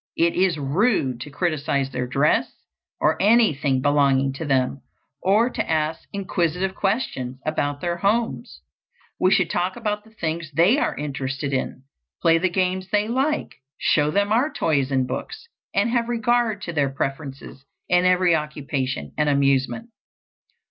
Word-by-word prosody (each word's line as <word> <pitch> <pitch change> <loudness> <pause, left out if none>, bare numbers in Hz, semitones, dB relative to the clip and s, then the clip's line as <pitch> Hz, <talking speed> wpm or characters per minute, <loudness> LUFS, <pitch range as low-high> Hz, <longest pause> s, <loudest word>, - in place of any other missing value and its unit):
It 170 0 +3
is 180 -3 +2
rude 140 - 0
to 150 - -7
criticise 140 -4 -1
their 125 -1 -3
dress 140 +4 +2 0.5
or - - +1
anything 160 - +3
belonging 140 -2 +3
to 150 +4 -6
them, 135 -1 0 0.4
or 210 +5 +3
to - - -3
ask 160 0 -1
inquisitive 185 -1 -1
questions 190 - -2
about 145 -2 -1
their 175 0 -1
homes. 185 - -1 0.6
We 185 - +4
should 185 -3 +2
talk 180 +2 -1
about 210 -3 -3
the 220 - -19
things 165 -6 -4
they 180 - +4
are - - -1
interested 135 -1 -3
in, 130 0 -3 0.4
play 165 -1 +4
the 185 +2 +1
games 185 +1 -1
they 210 0 +1
like, 270 +6 -1 0.2
show 150 0 +2
them 200 +5 +1
our 250 +8 +2
toys 140 -5 0
and 130 -1 +1
books, 445 - -6 0.2
and 205 +4 +1
have 235 -1 0
regard 235 -2 +1
to 170 - -5
their 145 -3 +1
preferences 135 0 -5 0.2
in 180 0 +3
every 180 -1 +4
occupation 140 - -3
and 150 0 +2
amusement. 140 - +1
165 Hz, 150 wpm, -23 LUFS, 140-200 Hz, 0.6 s, We